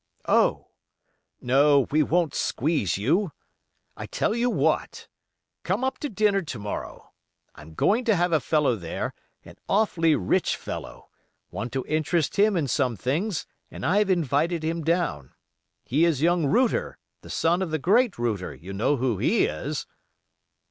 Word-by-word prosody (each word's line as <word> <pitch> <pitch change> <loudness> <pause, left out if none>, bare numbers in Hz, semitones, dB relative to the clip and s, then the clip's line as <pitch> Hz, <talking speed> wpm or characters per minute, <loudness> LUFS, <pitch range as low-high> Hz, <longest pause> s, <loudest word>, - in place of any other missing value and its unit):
"Oh! - - +2 0.7
no, 140 +3 +4
we 155 +2 +3
won't 165 0 +1
squeeze 130 - 0
you. 160 - +1 0.6
I - - -7
tell - - -1
you 240 +2 +1
what, - - -1 0.5
come - - -1
up 265 0 -1
to 295 - -3
dinner 205 -2 +2
to 150 -8 -6
morrow. 105 -1 -7 0.4
I'm 80 +1 -14
going 225 - +2
to 225 -4 +3
have 175 0 +1
a 160 - +3
fellow 150 -1 +1
there, 85 -5 -4 0.3
an - - -14
awfully 170 -6 +2
rich 95 -6 +1
fellow—want 120 - -9
to 135 -1 -2
interest 155 +2 0
him 205 -1 +4
in 150 -4 0
some 125 -1 0
things, 160 - -2 0.2
and - - -7
I've 200 +5 +2
invited 165 -1 +1
him 165 +1 -2
down. 165 - -1 0.5
He 145 +6 +1
is 165 -6 +1
young 170 -2 +3
Router, 240 - +1 0.2
the - - -13
son 170 +3 +1
of 185 - -2
the 155 - -1
great 210 - +2
Router, 110 - -2
you 90 +9 -9
know 110 +9 +1
who 120 -5 -1
he - - +3
is?" - - -4
160 Hz, 155 wpm, -25 LUFS, 130-190 Hz, 0.7 s, no